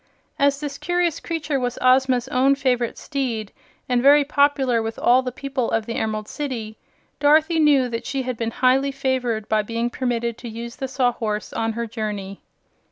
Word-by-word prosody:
As 280 0 +3
this 285 -1 -5
curious 350 -2 0
creature 305 -4 -2
was 245 -1 -2
Ozma's 255 -1 +3
own 270 +2 +3
favorite 250 -4 0
steed, 240 -8 -3 0.4
and 245 -1 +1
very 285 +2 +6
popular 280 -4 +2
with 225 0 -4
all 250 +2 +4
the 255 -1 -4
people 265 -1 -3
of 225 -1 0
the 230 - -4
Emerald 215 -2 -2
City, 240 -7 -5 0.4
Dorothy 310 +3 +4
knew 285 -4 +4
that 230 -1 -5
she 270 -1 -2
had 255 0 -3
been 230 0 -2
highly 260 +3 +2
favored 255 -5 -1
by 215 -1 +2
being 230 +3 -2
permitted 235 -2 -2
to 240 - -7
use 235 +2 -7
the 265 - -3
Sawhorse 240 -5 -1
on 225 0 -1
her 235 +1 -3
journey. 210 -3 -5
250 Hz, 175 wpm, -22 LUFS, 230-275 Hz, 0.4 s, very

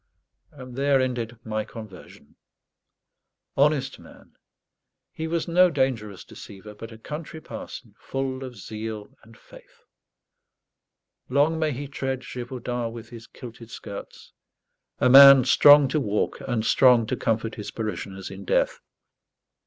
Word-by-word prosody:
And 130 -4 -11
there 140 0 +2
ended 120 -2 -3
my 110 -1 -3
conversion. 110 -4 -13 1.2
Honest 140 -1 +1
man! - - -17 0.8
he 160 - -5
was 165 0 -2
no 180 +2 +4
dangerous 120 - -2
deceiver; 105 +2 -12
but 115 +2 -10
a 110 - -11
country 150 +6 -8
parson, - - -10
full 135 0 -4
of 130 -2 -8
zeal 110 +4 -7
and 115 0 -18
faith. - - -19 1.5
Long 145 +5 +2
may 155 -1 0
he 140 +2 -6
tread 135 -1 -4
Gévaudan 120 -2 -5
with 115 -1 -10
his 115 -1 -12
kilted 115 -2 -12
skirts 100 -3 -10 0.6
a - - +2
man 135 0 +9
strong 145 +2 +7
to 155 - 0
walk 105 -6 -2
and 120 -3 -1
strong 125 -3 +5
to - - -2
comfort 110 0 -2
his 105 - -7
parishioners 100 -4 -6
in 95 0 -9
death! - - 0
125 Hz, 130 wpm, -24 LUFS, 110-140 Hz, 1.5 s, man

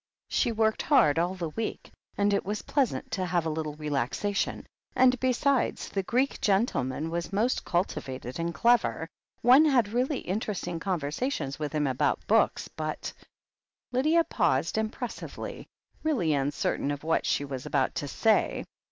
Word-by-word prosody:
She 240 - +1
worked 220 -1 +1
hard 150 +1 +4
all 175 +2 0
the 170 -3 -3
week, 225 +6 -4 0.3
and 205 0 +2
it 200 - +1
was 205 +2 -3
pleasant 275 -5 0
to 185 - -1
have 175 -2 0
a 160 - 0
little 155 -1 -3
relaxation, 150 - -2 0.3
and, 255 -1 +4
besides, 260 +1 +1
the 195 - -1
Greek 250 +8 0
gen 200 +2 +4
tleman 145 - -3
was 170 +2 -3
most 220 +6 +1
cultivated 135 -7 -2
and 170 +1 -1
clever 240 +6 +2 0.2
— - - -45
one 260 +6 +7
had 250 -8 +3
really 255 +4 0
interesting 185 -3 -3
conversations 160 - -2
with 150 0 -3
him 150 -1 +1
about 130 -2 0
books. - - +2
But - - -5 0.8
Lydia 310 +7 +3
paused 165 - +1
impressively, 220 +3 -5 0.3
really 240 - +1
uncertain 140 0 0
of 145 0 -3
what 160 +1 +1
she 145 - +1
was 135 -2 -6
about 135 -2 +1
to 145 - -5
say. 220 +9 +1
185 Hz, 155 wpm, -28 LUFS, 150-240 Hz, 0.8 s, one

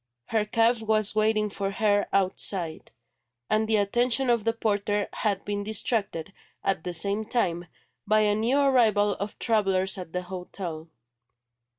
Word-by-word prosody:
Her 220 -2 +1
cab 230 +2 +2
was 215 -1 +2
waiting 215 -1 +1
for 195 0 -2
her 205 0 +1
outside; 185 -3 -1 0.6
and 215 0 +2
the 220 - +2
attention 240 +5 +2
of 230 -3 +1
the 230 - +2
porter 205 -2 -1
had 200 -3 -1
been 205 0 -2
distracted, 205 -4 -2 0.3
at 190 -4 0
the 180 -1 -4
same 200 +5 0
time, 180 -7 -1 0.4
by 215 +1 +4
a 210 -1 +3
new 230 +6 +1
arrival 225 -7 +3
of 205 +1 -5
travellers 195 -4 +1
at 180 -3 -8
the 180 +1 -3
hotel. 180 -3 -7
205 Hz, 150 wpm, -26 LUFS, 195-220 Hz, 0.6 s, by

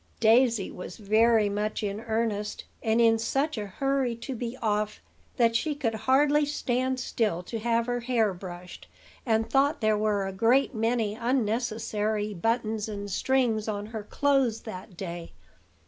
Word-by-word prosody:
Daisy 230 -2 +4
was 180 0 -8
very 220 +1 +3
much 210 +2 -2
in 205 0 -2
earnest, 220 -2 -2 0.2
and 225 +1 +1
in 225 -1 +5
such 275 +7 0
a 210 -2 -4
hurry 270 +3 0
to 235 +4 -6
be 240 +1 -5
off 210 -1 -1 0.4
that 230 -2 +3
she 295 +6 0
could 250 -6 -1
hardly 280 +7 +3
stand 260 -3 -1
still 215 -8 -1
to 225 +5 -5
have 230 +1 +1
her 245 0 -1
hair 235 -4 +1
brushed, 180 -1 -9 0.4
and 225 -1 +2
thought 275 +6 +2
there 215 -1 +2
were 210 -2 0
a 195 - -4
great 240 +8 +3
many 225 -1 0
unnecessary 220 -3 -1
buttons 220 +2 -1
and 205 -1 -5
strings 235 -2 +1
on 205 -1 -3
her 220 0 -6
clothes 270 -1 +1
that 185 -3 -9
day. 170 -2 -6
225 Hz, 155 wpm, -27 LUFS, 210-245 Hz, 0.4 s, in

